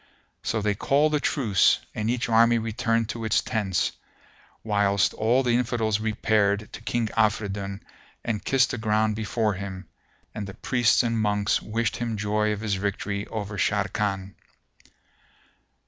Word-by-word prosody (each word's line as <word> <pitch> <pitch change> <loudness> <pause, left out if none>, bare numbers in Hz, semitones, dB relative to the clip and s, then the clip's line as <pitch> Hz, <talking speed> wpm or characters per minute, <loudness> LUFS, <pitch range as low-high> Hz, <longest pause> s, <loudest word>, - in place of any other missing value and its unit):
So 110 -2 -2
they 105 0 +2
called 145 +9 +2
a 150 - +3
truce 115 - +3 0.2
and 110 +1 -2
each 120 0 0
army 115 +1 +5
returned 115 0 0
to 115 +1 -4
its 110 - +2
tents, 95 -5 0 0.7
whilst 100 -2 +2
all 120 +5 +2
the 125 - +1
Infidels 115 -3 +1
repaired 105 -1 +1
to - - -8
King 115 -1 -1
Afridun 100 -2 0 0.4
and 110 -3 -2
kissed 135 -2 +2
the 125 - -4
ground 110 -1 +1
before 110 0 0
him, 95 0 -7 0.5
and 105 -2 -5
the 100 - -9
priests 125 -1 +2
and 115 -1 0
monks 105 -1 +1
wished 115 +1 -2
him 115 -2 -3
joy 105 +1 0
of 105 0 -3
his 110 -3 -1
victory 100 +1 -2
over 105 -2 -5
Sharrkan. 95 -1 -1
110 Hz, 145 wpm, -25 LUFS, 100-115 Hz, 0.7 s, army